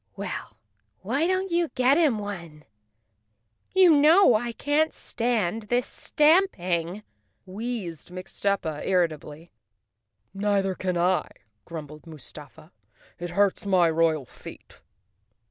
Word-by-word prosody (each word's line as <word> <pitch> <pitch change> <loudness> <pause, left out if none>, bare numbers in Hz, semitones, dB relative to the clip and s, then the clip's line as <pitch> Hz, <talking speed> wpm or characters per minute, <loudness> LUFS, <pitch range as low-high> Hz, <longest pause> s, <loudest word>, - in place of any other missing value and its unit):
"Well, 105 - -6 0.4
why 275 - 0
don't 375 0 -1
you 340 0 +2
get 255 +2 +4
him 300 -8 +3
one? 170 -7 -7 1.1
You 370 -2 +7
know 310 +2 +6
I 235 +2 0
can't 290 +6 0
stand 225 -3 -2
this 245 0 +1
stamping," 210 - +1 0.4
wheezed 195 -5 -6
Mixtuppa 185 -3 -3
irri¬ 180 -3 +2
tably. 155 +2 -11 0.8
"Neither 195 -1 0
can 185 -1 -2
I," 180 +2 +1 0.4
grumbled 155 -1 -9
Mustafa. 155 +1 -12 0.5
"It 175 0 -5
hurts 200 +2 +1
my 180 -4 +4
royal 160 -3 +1
feet." - - -13
195 Hz, 110 wpm, -25 LUFS, 170-245 Hz, 1.1 s, You